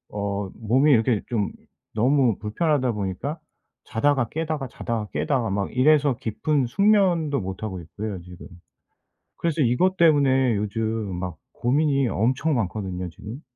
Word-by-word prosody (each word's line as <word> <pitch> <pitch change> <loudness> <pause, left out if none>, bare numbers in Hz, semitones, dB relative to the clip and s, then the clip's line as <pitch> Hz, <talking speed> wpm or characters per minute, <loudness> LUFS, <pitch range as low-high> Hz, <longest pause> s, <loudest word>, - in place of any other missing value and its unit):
어 100 -1 -2
몸이 130 +7 +3
이렇게 115 -3 +3
좀 110 -4 -1 0.4
너무 125 -1 +3
불편하다 130 - 0
보니까 105 - -4 0.5
자다가 130 +1 +1
깨다가 155 -3 -3
자다가 115 -2 -4
깨다가 130 -7 0
막 100 +3 -2
이래서 140 -1 +4
깊은 135 +4 0
숙면도 180 - +2
못하고 95 0 -5
있고요 100 +3 -6
지금. 90 0 -12 0.9
그래서 165 -2 -1
이것 150 +10 +2
때문에 135 -7 +4
요즘 105 -1 -2
막 90 -3 -5 0.2
고민이 140 +1 +1
엄청 130 +9 +1
많거든요 95 -4 -3
지금. 110 - -9
120 Hz, 295 characters per minute, -24 LUFS, 105-145 Hz, 0.9 s, 이래서